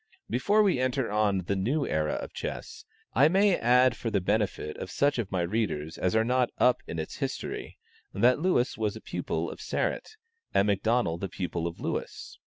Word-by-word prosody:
Before 205 - +3
we 190 -10 +2
enter 130 -2 0
on 105 -3 +2
the 100 +3 -1
new 130 +10 0
era 75 -1 0
of - - -5
chess, - - -6 0.3
I 135 +5 +6
may 195 +3 +4
add 125 0 +4
for 115 - -3
the 105 -3 +1
benefit 100 -5 -1
of - - -6
such 145 -2 +1
of 105 -5 -3
my 95 -2 0
readers 85 -5 -2
as 90 +3 0
are 110 - +4
not 125 0 +2
"up" 125 0 +3
in - - -5
its 80 - -5
history, - - -4 0.3
that 125 +7 +3
Lewis 145 -10 +1
was 105 -2 0
the - - -9
pupil - - -3
of - - -10
Sarratt, 440 - -2 0.4
and 100 - +4
McDonnel 100 -3 +1
the 95 - -3
pupil 85 -2 -3
of 85 - -7
Lewis. - - -5
110 Hz, 195 wpm, -28 LUFS, 95-130 Hz, 0.4 s, I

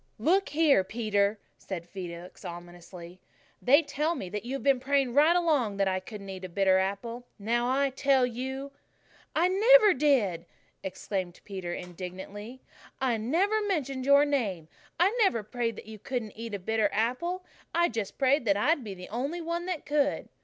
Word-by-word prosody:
"Look 365 - +2
here, 295 -8 +4
Peter," 205 0 0 0.2
said 175 -3 -6
Felix 175 -1 -8
ominously, 175 +1 -10 0.4
"they 285 +6 +5
tell 305 +3 -1
me 190 - -5
that 210 +1 -4
you've 265 +3 -4
been 275 -2 +4
praying 270 -1 +1
right 305 +5 +5
along 290 - +1
that 195 -1 +2
I 185 0 0
couldn't 200 +1 -9
eat 190 0 -8
a 185 - -5
bitter 190 +1 +3
apple. 230 +6 -3
Now, 235 +4 0
I 275 +1 +2
tell 270 -1 +3
you 265 +3 -5 0.3
" - - -30
"I 335 +3 +4
never 425 +2 +6
did!" 250 - +1 0.4
exclaimed 185 -1 -4
Peter 190 -4 -5
indignantly. 190 +7 -8 0.4
"I 255 -4 +1
never 360 - +1
mentioned 275 -10 -2
your 280 +1 +6
name. 205 - -1 0.3
I 385 +6 +3
never 305 - +3
prayed 230 +1 -2
that - - -10
you 215 0 -10
couldn't 240 -2 -4
eat 225 -1 -5
a - - -2
bitter 215 +2 0
apple. 340 - -1 0.3
I 345 0 +4
just 225 - -4
prayed 275 +1 +3
that 200 -2 +3
I'd 290 +6 +2
be 200 -3 -6
the 180 0 -10
only 275 - -3
one 340 +2 -3
that 360 -5 -3
could." 290 -1 0
240 Hz, 175 wpm, -28 LUFS, 195-285 Hz, 0.4 s, never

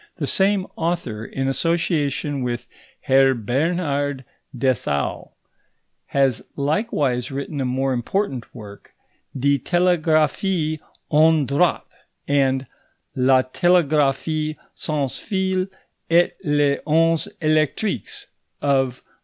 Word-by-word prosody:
The - - -3
same 195 0 +2
author, 165 -11 -2
in 135 +3 -3
association 145 -1 0
with 120 -1 -3 0.4
Herr 135 0 +4
Bernhard 145 - -1 0.3
Dessau, 115 - -1 0.8
has 135 -4 +1
likewise 140 - 0
written 140 +1 -4
a - - -1
more 130 +1 0
important 130 - -2
work, 105 -3 -12 0.4
Die 140 +2 +2
Telegraphie 160 0 +1 0.3
ohne 155 -1 +4
Draht; 145 +7 +1 0.4
and 135 -2 +2 0.5
La 130 0 +4
Telegraphie 155 0 +1 0.2
sans 145 -4 -2
fil 190 -2 -1 0.4
et 170 +1 +3
les 145 -3 +2
ondes 165 +1 +3
Électriques 155 - 0 0.3
of 135 -3 0
MM. - - -36
145 Hz, 95 wpm, -22 LUFS, 130-165 Hz, 0.8 s, Herr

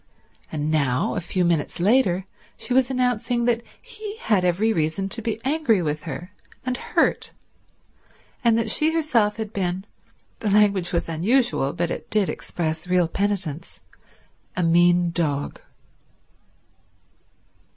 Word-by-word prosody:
And 155 0 -2
now, 140 -4 +1
a - - -2
few 180 +2 -1
minutes 170 -1 0
later, 195 -2 +3 0.3
she 250 - -3
was 260 0 +3
announcing 245 -2 0
that 235 -1 +2 0.2
he 430 -1 -9
had 210 - +1
every 190 +6 +2
reason 160 +4 -1
to 230 - -2
be 225 -1 -2
angry 270 -7 +2
with 155 -2 -2
her 175 +3 -6 0.3
and 255 0 -1
hurt, - - 0 1.1
and 230 -2 +4
that 225 -2 0
she 310 +6 +3
herself 235 -10 +2
had 220 -1 -5
been—the 190 +3 -5
language 200 -3 +3
was 170 - -1
unusual, 180 - +1
but 170 0 -1
it - - -6
did 210 -3 +2
express 160 0 -3
real 180 -2 +3
penitence—a 180 -1 -5
mean 175 +1 +4
dog. 150 -4 -2
190 Hz, 130 wpm, -23 LUFS, 170-230 Hz, 1.1 s, and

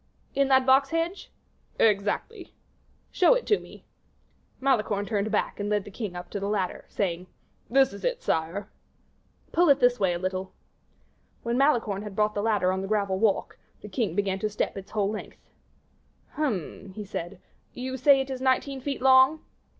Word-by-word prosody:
"In 275 -1 +2
that 265 -1 +4
box 270 +1 +5
hedge?" 330 +4 -2 0.5
"Exactly." 215 - 0 0.6
"Show 380 +6 +5
it - - -2
to 420 - +3
me." - - -14 0.7
Malicorne 215 -6 +1
turned 210 0 -1
back, 210 - -1
and 205 0 -2
led 210 -1 +1
the 205 - -10
king 200 -3 -5
up 175 0 -8
to 200 - -3
the 200 +1 -3
ladder, 195 -4 -2
saying, 180 -2 -2 0.4
"This 265 -1 +4
is 200 - -10
it, - - 0
sire." 170 +6 -2 0.8
"Pull 345 -1 +3
it 280 0 +5
this 245 -2 +3
way 190 -3 +2
a - - -2
little." 185 +1 -4 0.9
When 235 0 -1
Malicorne 240 -7 +2
had 210 -2 -8
brought 210 0 +1
the 205 - -2
ladder 205 -4 +2
on 190 - -1
to - - -3
the 195 - -4
gravel 200 -2 0
walk, 215 -2 0 0.2
the 210 - -8
king 200 -4 -1
began 195 -1 0
to 215 - -1
step 210 - -2
its 195 -1 -8
whole 205 -2 0
length. 215 - -7 0.9
"Hum!" 200 - -3
he 210 - -6
said; 180 -1 -6 0.4
"you 260 +1 -4
say 270 +1 +5
it 270 0 -5
is 260 -1 -5
nineteen 265 +1 0
feet 275 -1 -4
long?" 265 +4 +6
215 Hz, 180 wpm, -27 LUFS, 195-265 Hz, 0.9 s, long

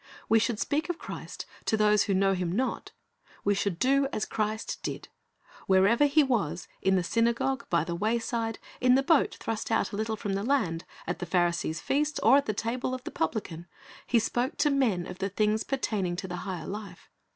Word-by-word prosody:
We 225 - +5
should 225 0 0
speak 310 +5 -1
of 350 - -1
Christ - - -7 0.2
to 220 - +2
those 210 -1 +4
who 195 - +1
know 195 +1 +3
Him 180 -2 -1
not. 250 +8 -1 0.5
We 205 - +3
should 200 -3 -1
do 275 +5 +3
as 215 - -1
Christ 215 0 -3
did. - - -5 0.6
Wherever 200 +9 +5
He 295 +2 +4
was, 220 - -1
in 190 0 +3
the 180 - +2
synagogue, 235 +5 0
by 170 -3 +2
the 170 - -4
wayside, 225 +3 -1 0.2
in 250 0 +5
the 270 - +3
boat 315 +1 +3
thrust 225 -1 -3
out 225 +1 +1
a - - -4
little 220 +1 -1
from 205 -2 -3
the 195 - -1
land, 200 -11 0 0.2
at 175 - -3
the 175 - -4
Pharisee's 170 -2 0
feast 295 +2 0
or 265 +6 +7
the 250 - -2
table 240 +4 -2
of 255 - -8
the - - -6
publican. 170 -1 -3 0.4
He 240 - +3
spoke 240 +4 0
to 295 - +3
men 230 -11 +1
of 180 0 -8
the 195 - -1
things 215 +2 +1
pertaining 210 -9 -1
to 190 +2 -5
the 180 -1 -5
higher 180 -3 -5
life. 200 -3 -7
215 Hz, 200 wpm, -28 LUFS, 185-250 Hz, 0.6 s, or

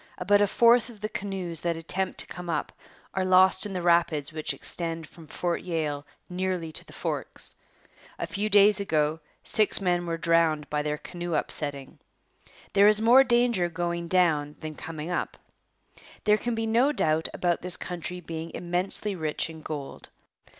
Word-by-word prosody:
About 205 0 +3
a 205 - +4
fourth 235 +3 +4
of 225 -3 -13
the 215 - -3
canoes 190 -6 -3
that 170 -1 -1
attempt 185 +3 -3
to - - 0
come 180 -1 -8
up 165 - -2 0.4
are 190 - 0
lost 185 +2 +4
in 200 - -7
the 180 -2 -3
rapids 170 -3 +2
which 155 -1 -2
extend 165 -2 -3
from 160 0 -15
Fort 175 +2 -2
Yale 150 -5 -3 0.2
nearly 180 -2 -3
to - - -7
the - - -17
Forks. - - -1 0.6
A - - -3
few 205 +1 -2
days 205 0 +6
ago 155 -5 0 0.2
six 215 -1 +5
men 175 -2 0
were 165 0 -2
drowned 165 -3 +2
by 150 0 0
their 150 0 -2
canoe 175 +1 -5
upsetting. 145 -3 -4 0.7
There 200 +1 +6
is 210 0 +6
more 240 +4 +7
danger 240 -7 +2
going 170 0 -3
down 160 -5 +2
than 155 0 -6
coming 160 +2 -7
up. 175 - -3 0.9
There 210 0 +4
can 240 +1 -3
be 225 0 -2
no 235 +6 +3
doubt 160 - 0
about 175 -1 -1
this 180 0 -1
country 180 0 -6
being 165 0 -6
immensely 180 +3 -1
rich 160 -1 -2
in 160 -1 -11
gold. 145 -3 -7
175 Hz, 170 wpm, -27 LUFS, 160-200 Hz, 0.9 s, more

